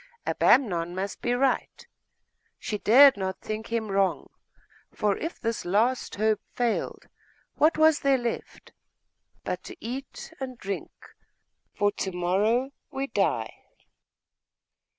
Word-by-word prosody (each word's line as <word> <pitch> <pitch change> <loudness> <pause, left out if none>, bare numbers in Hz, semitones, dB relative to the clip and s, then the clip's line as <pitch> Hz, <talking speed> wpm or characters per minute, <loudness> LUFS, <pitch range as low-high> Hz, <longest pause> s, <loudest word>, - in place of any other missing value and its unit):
Abamnon 175 -9 +2
must 195 +2 -4
be 240 - 0
right.... 265 +1 0 0.7
She 210 - -4
dared 270 +4 +7
not 190 -1 -3
think 215 +1 -5
him 220 -3 -1
wrong; 195 -1 0 0.6
for 205 -2 0
if 330 +2 -5
this 230 -1 -2
last 225 +8 +1
hope 215 0 +1
failed, 240 -2 -2 0.5
what 310 +2 +4
was 315 -1 +5
there 275 -1 +3
left 240 -2 -5 0.7
but - - -4
to - - -9
eat 255 +3 -7
and 260 -2 -6
drink, 195 -2 -5 0.8
for 205 0 +2
to 195 -1 -4
morrow 210 +9 +1 0.2
we 270 0 -3
die? - - -1
225 Hz, 120 wpm, -27 LUFS, 200-260 Hz, 0.8 s, dared